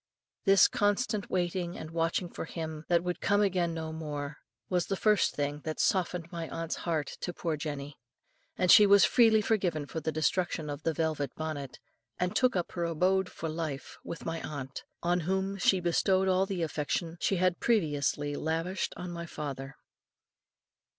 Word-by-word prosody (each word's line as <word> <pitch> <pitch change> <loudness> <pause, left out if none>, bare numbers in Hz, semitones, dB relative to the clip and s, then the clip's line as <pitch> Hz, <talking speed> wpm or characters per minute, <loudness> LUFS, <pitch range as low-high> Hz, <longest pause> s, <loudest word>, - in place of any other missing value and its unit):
This 195 -2 +7
constant 205 0 0
waiting 175 -1 -1
and 155 - -7
watching 165 +2 0
for 170 - -6
him 160 -2 -6
that 170 -1 +3
would 180 0 -3
come 205 +1 +3
again 180 -4 +1
no 160 -1 -4
more, 150 -2 -5 0.3
was 180 -2 0
the 195 - 0
first 210 0 +3
thing 145 0 -2
that 155 0 -4
softened 180 -3 0
my 165 -1 -5
aunt's 165 0 -3
heart 160 -4 -1 0.2
to 175 - -2
poor 165 -2 -2
Jenny; 145 -1 -5 0.6
and 180 -1 +4
she 210 -2 +9
was 200 0 +7
freely 225 -3 +5
forgiven 180 -9 0
for 160 - -5
the 160 0 -2
destruction 155 0 0
of 145 +1 -6
the 165 +1 0
velvet 155 -3 0
bonnet, 150 -4 -5 0.4
and 180 0 -1
took 255 -4 +3
up 175 -2 -1
her 175 - -3
abode 180 +3 +1
for 165 - -5
life 155 -3 -5
with 165 - -7
my 165 0 -3
aunt, 135 -3 -6 0.2
on 175 +1 +2
whom 190 +3 -1
she 190 +1 +4
bestowed 185 +2 +2
all 190 +1 +3
the 185 -3 -2
affection 160 +2 -2
she 195 - +2
had 185 -1 +1
previously 145 -8 +1
lavished 165 +5 -2
on 180 0 -5
my 170 0 -6
father." 135 -3 -6
170 Hz, 175 wpm, -30 LUFS, 155-185 Hz, 0.6 s, she